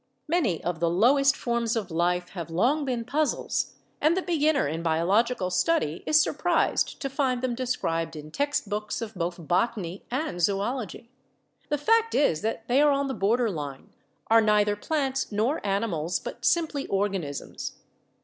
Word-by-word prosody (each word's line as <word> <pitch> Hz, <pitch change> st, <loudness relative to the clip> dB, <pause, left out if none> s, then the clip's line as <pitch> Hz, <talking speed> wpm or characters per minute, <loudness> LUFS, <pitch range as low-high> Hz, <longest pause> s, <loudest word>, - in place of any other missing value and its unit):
Many 300 Hz, -, 0 dB
of 175 Hz, -2 st, -2 dB
the 170 Hz, 0 st, +2 dB
lowest 275 Hz, +10 st, +4 dB
forms 235 Hz, -1 st, -1 dB
of 205 Hz, -6 st, -3 dB
life 175 Hz, +2 st, 0 dB
have 170 Hz, -4 st, -6 dB
long 250 Hz, -, +1 dB
been 245 Hz, -3 st, -2 dB
puzzles 295 Hz, +4 st, -1 dB, 0.3 s
and 315 Hz, +4 st, +3 dB
the 375 Hz, -, 0 dB
beginner 310 Hz, -, +2 dB
in 160 Hz, +3 st, -3 dB
biological 185 Hz, +5 st, +1 dB
study 180 Hz, -, +1 dB
is 305 Hz, 0 st, +5 dB
surprised 325 Hz, +3 st, +1 dB
to -, -, 0 dB
find 260 Hz, -2 st, -1 dB
them 255 Hz, -2 st, 0 dB
described 165 Hz, -10 st, -2 dB
in 155 Hz, 0 st, -9 dB
text 285 Hz, -, -1 dB
books 210 Hz, +1 st, -3 dB
of 225 Hz, -1 st, -7 dB
both 175 Hz, -3 st, -4 dB
botany 190 Hz, -1 st, -1 dB
and 255 Hz, -, -2 dB
zoology. 210 Hz, +5 st, -1 dB, 0.6 s
The 295 Hz, -, +1 dB
fact 455 Hz, +9 st, +2 dB
is 220 Hz, -, +2 dB
that 225 Hz, +1 st, -3 dB
they 255 Hz, +4 st, +4 dB
are 295 Hz, -, +5 dB
on 280 Hz, -1 st, +1 dB
the -, -, -1 dB
border 230 Hz, +2 st, +1 dB
line, 145 Hz, -5 st, -7 dB, 0.3 s
are 225 Hz, 0 st, +5 dB
neither 210 Hz, -1 st, +3 dB
plants 270 Hz, +2 st, -1 dB
nor 225 Hz, +9 st, 0 dB
animals 195 Hz, -5 st, -1 dB
but -, -, -7 dB
simply 315 Hz, -5 st, +1 dB
organisms. 195 Hz, -8 st, -3 dB
225 Hz, 160 wpm, -26 LUFS, 180-275 Hz, 0.6 s, is